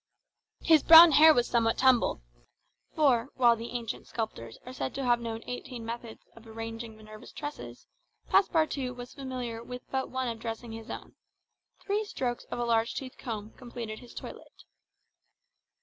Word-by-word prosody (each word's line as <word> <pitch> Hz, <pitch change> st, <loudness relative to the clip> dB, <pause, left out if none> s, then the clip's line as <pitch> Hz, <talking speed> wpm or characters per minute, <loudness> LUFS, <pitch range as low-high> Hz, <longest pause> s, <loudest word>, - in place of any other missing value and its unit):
His 320 Hz, -3 st, +5 dB
brown 330 Hz, +1 st, +10 dB
hair 315 Hz, +2 st, +8 dB
was 245 Hz, -5 st, +3 dB
somewhat 230 Hz, -1 st, +1 dB
tumbled; 255 Hz, -, +3 dB, 0.7 s
for, 270 Hz, -5 st, +3 dB
while 240 Hz, -2 st, +5 dB
the 230 Hz, +1 st, -7 dB
ancient 235 Hz, -2 st, -5 dB
sculptors 215 Hz, -, -5 dB
are 255 Hz, -, -8 dB
said -, -, -4 dB
to 275 Hz, -, -3 dB
have 240 Hz, -1 st, +3 dB
known 230 Hz, -1 st, -5 dB
eighteen 245 Hz, -1 st, -7 dB
methods 230 Hz, -1 st, -7 dB
of 230 Hz, 0 st, -16 dB
arranging 225 Hz, 0 st, -7 dB
Minerva's 215 Hz, 0 st, -13 dB
tresses, 295 Hz, -1 st, -8 dB, 0.4 s
Passepartout 305 Hz, -8 st, +1 dB
was 245 Hz, 0 st, -9 dB
familiar 255 Hz, -4 st, -5 dB
with 250 Hz, +1 st, -8 dB
but 265 Hz, 0 st, -2 dB
one 260 Hz, -1 st, -2 dB
of 230 Hz, -1 st, -4 dB
dressing 225 Hz, +1 st, -6 dB
his 225 Hz, +1 st, -9 dB
own: -, -, -8 dB, 0.7 s
three 415 Hz, +2 st, 0 dB
strokes 250 Hz, -, -4 dB
of -, -, -6 dB
a 240 Hz, -, -1 dB
large 230 Hz, -1 st, +1 dB
tooth 260 Hz, -2 st, -7 dB
comb 220 Hz, -3 st, -6 dB
completed 235 Hz, -3 st, -8 dB
his 245 Hz, -, -15 dB
toilet. -, -, -10 dB
240 Hz, 160 wpm, -29 LUFS, 225-260 Hz, 0.7 s, brown